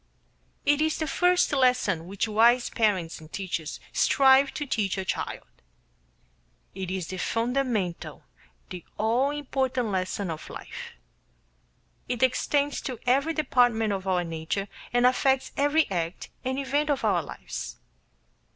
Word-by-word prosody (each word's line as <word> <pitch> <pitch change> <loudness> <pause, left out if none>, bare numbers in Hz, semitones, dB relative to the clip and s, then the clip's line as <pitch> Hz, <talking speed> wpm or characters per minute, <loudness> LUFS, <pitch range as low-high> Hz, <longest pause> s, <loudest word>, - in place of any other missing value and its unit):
It 290 +1 +3
is 315 0 +1
the 315 - -1
first 360 +4 +2
lesson 250 - +2
which 200 +4 -2
wise 235 +3 +4
parents 195 -7 0
and 155 0 -14
teachers 175 -5 -4
strive 270 0 +5
to 295 - -3
teach 210 -7 -1
a 190 - -3
child. - - -3 1.3
It 190 -1 -5
is 185 -3 -3
the 185 - -5
fundamental, 230 -6 -1 0.5
the 180 -1 -7
all 235 +6 +2
important 265 -4 -1
lesson 185 -1 -2
of 155 - -7
life. - - -8 1.2
It 245 0 -1
extends 285 +3 +1
to 255 -3 -5
every 275 +6 +2
department 245 -7 +2
of 190 -1 -4
our 180 -2 +2
nature 165 +4 -3 0.2
and 245 0 +3
affects 265 +1 +2
every 290 +3 +3
act 170 -1 -3
and 260 +1 -2
event 285 +2 0
of 285 - 0
our - - +3
lives. - - -7
245 Hz, 135 wpm, -27 LUFS, 190-275 Hz, 1.3 s, strive